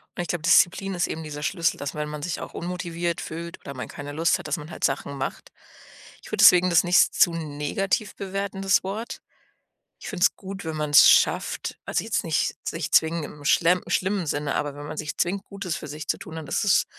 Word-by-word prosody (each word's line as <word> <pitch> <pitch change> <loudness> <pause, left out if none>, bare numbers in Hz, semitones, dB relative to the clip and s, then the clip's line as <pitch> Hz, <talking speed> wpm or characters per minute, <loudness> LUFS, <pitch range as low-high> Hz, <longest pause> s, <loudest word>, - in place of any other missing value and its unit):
Und 175 - -2
ich 175 - -4
glaube, 155 0 -3
Disziplin 185 +3 +4
ist 175 - 0
eben 160 - -5
dieser 150 -1 -7
Schlüssel, 170 -1 0
dass 145 +1 -5
wenn 150 0 -3
man 150 0 -6
sich 175 +3 -3
auch - - -8
unmotiviert 170 -1 -3
fühlt 170 +1 -7
oder 140 - -8
man 125 - -6
keine 145 0 -8
Lust 165 +3 +2
hat, - - -8
dass - - -1
man 150 +1 -9
halt - - -9
Sachen 140 0 -1
macht. 135 - -5 0.7
Ich - - -13
würde - - +2
deswegen 180 0 +8
das 170 0 +4
nicht 180 +1 +4
zu 170 - +4
negativ 165 +6 -2
bewerten, 195 0 -4
das 195 -1 +3
Wort. 210 +5 -5 0.8
Ich - - -9
finde 190 -2 0
es - - +3
gut, 195 -1 -8
wenn 160 -1 -3
man's 150 -1 +6
schafft - - +1
also, - - -1
jetzt - - -1
nicht - - 0
sich - - -4
zwingend 160 -1 +3
im 145 0 -10
schlemm 175 +3 +4
schlimmen 190 +1 0
Sinne, 145 -1 -2
aber 145 -1 -2
wenn 145 0 -8
man 155 0 -7
sich 155 -1 -4
zwingt, 190 +3 -1
Gutes 195 -4 -5
für - - -8
sich 150 +2 -7
zu - - 0
tun, 160 - -9
dann 160 -2 -6
ist - - -1
es 200 - +4
170 Hz, 225 wpm, -25 LUFS, 150-185 Hz, 0.8 s, deswegen